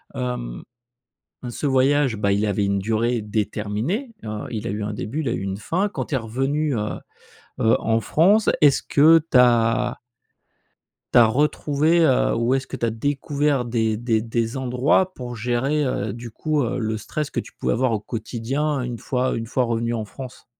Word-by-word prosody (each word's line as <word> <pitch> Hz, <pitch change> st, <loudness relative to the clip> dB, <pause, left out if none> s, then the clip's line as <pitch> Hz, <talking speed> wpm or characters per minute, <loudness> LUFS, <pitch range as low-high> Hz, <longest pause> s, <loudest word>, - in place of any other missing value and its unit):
Hem, -, -, -4 dB, 0.8 s
heu -, -, -4 dB
ce 135 Hz, -, -3 dB
voyage, 135 Hz, -1 st, +3 dB
bah, 100 Hz, -1 st, 0 dB
il 100 Hz, +2 st, +1 dB
avait 100 Hz, -1 st, 0 dB
une 100 Hz, 0 st, +1 dB
durée 115 Hz, +3 st, 0 dB
déterminée. 110 Hz, -, -2 dB
Heu, 105 Hz, -1 st, -5 dB
il 110 Hz, -1 st, -4 dB
a -, -, -2 dB
eu 105 Hz, +1 st, -3 dB
un 105 Hz, +1 st, -3 dB
début 110 Hz, +8 st, -4 dB
il 140 Hz, -, -2 dB
a -, -, -1 dB
eu -, -, -2 dB
une 95 Hz, 0 st, -3 dB
fin 175 Hz, -, -1 dB
quand 205 Hz, -, -4 dB
tu 145 Hz, -, -1 dB
es -, -, +1 dB
revenu 135 Hz, +5 st, -1 dB
heu, 105 Hz, -1 st, -3 dB, 0.6 s
heu, 110 Hz, 0 st, +4 dB
en 115 Hz, 0 st, +1 dB
France 195 Hz, -, +3 dB
est-ce 145 Hz, -3 st, +5 dB
que 160 Hz, +3 st, +6 dB
tu -, -, +5 dB
as 120 Hz, -2 st, +3 dB, 1.2 s
tu -, -, +8 dB
as 120 Hz, -, +8 dB
retrouvé, 150 Hz, +5 st, +2 dB
heu, 135 Hz, -5 st, +3 dB
ou 115 Hz, +3 st, +1 dB
est-ce 135 Hz, 0 st, -1 dB
que -, -, -6 dB
tu -, -, -3 dB
as -, -, 0 dB
découvert 140 Hz, +3 st, 0 dB
des 110 Hz, -2 st, 0 dB
des 115 Hz, -1 st, 0 dB
des 115 Hz, +1 st, -2 dB
endroits 130 Hz, +8 st, +1 dB
pour 120 Hz, -1 st, -7 dB
gérer, 125 Hz, +6 st, 0 dB
heu, 110 Hz, -6 st, -2 dB
du 115 Hz, 0 st, -8 dB
coup, 155 Hz, +4 st, -1 dB
heu, 120 Hz, +2 st, -2 dB
le 110 Hz, -1 st, -1 dB
stress 150 Hz, +7 st, -4 dB
que -, -, -5 dB
tu -, -, -5 dB
pouvais -, -, -2 dB
avoir 130 Hz, 0 st, +1 dB
au 110 Hz, -, 0 dB
quotidien 130 Hz, +7 st, -2 dB
une 120 Hz, -1 st, -4 dB
fois 130 Hz, +1 st, -1 dB
une 115 Hz, -, -4 dB
fois 125 Hz, +2 st, 0 dB
revenu 115 Hz, 0 st, -1 dB
en 110 Hz, -2 st, -2 dB
France? 125 Hz, +4 st, -10 dB
120 Hz, 200 wpm, -22 LUFS, 110-140 Hz, 1.2 s, tu